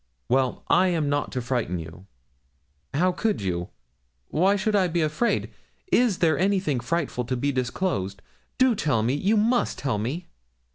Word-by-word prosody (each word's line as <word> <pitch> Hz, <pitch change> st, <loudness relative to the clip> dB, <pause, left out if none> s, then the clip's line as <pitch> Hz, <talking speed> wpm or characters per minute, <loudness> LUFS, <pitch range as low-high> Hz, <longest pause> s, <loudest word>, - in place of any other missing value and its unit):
'Well, 130 Hz, 0 st, +1 dB
I 185 Hz, +2 st, +4 dB
am 160 Hz, -5 st, 0 dB
not 145 Hz, 0 st, -1 dB
to 125 Hz, -, -2 dB
frighten 120 Hz, -8 st, -1 dB
you.' 80 Hz, +3 st, -9 dB, 0.9 s
'How 180 Hz, +5 st, +3 dB
could 215 Hz, +4 st, -1 dB
you? 90 Hz, -3 st, -2 dB, 0.6 s
Why 190 Hz, +6 st, +3 dB
should 210 Hz, +1 st, 0 dB
I 190 Hz, -3 st, +3 dB
be 170 Hz, 0 st, 0 dB
afraid? 155 Hz, +10 st, 0 dB, 0.4 s
Is 235 Hz, -7 st, +3 dB
there 160 Hz, -4 st, +2 dB
anything 190 Hz, -8 st, +1 dB
frightful 140 Hz, -1 st, -2 dB
to 130 Hz, +2 st, -2 dB
be 140 Hz, +4 st, 0 dB
disclosed? 125 Hz, -, -2 dB, 0.3 s
Do 260 Hz, -1 st, +4 dB
tell 145 Hz, -, 0 dB
me 120 Hz, +4 st, +1 dB
you 195 Hz, +10 st, +2 dB
must 235 Hz, +4 st, +2 dB
tell 125 Hz, -7 st, -1 dB
me.' 140 Hz, -, -3 dB
150 Hz, 160 wpm, -25 LUFS, 120-190 Hz, 0.9 s, I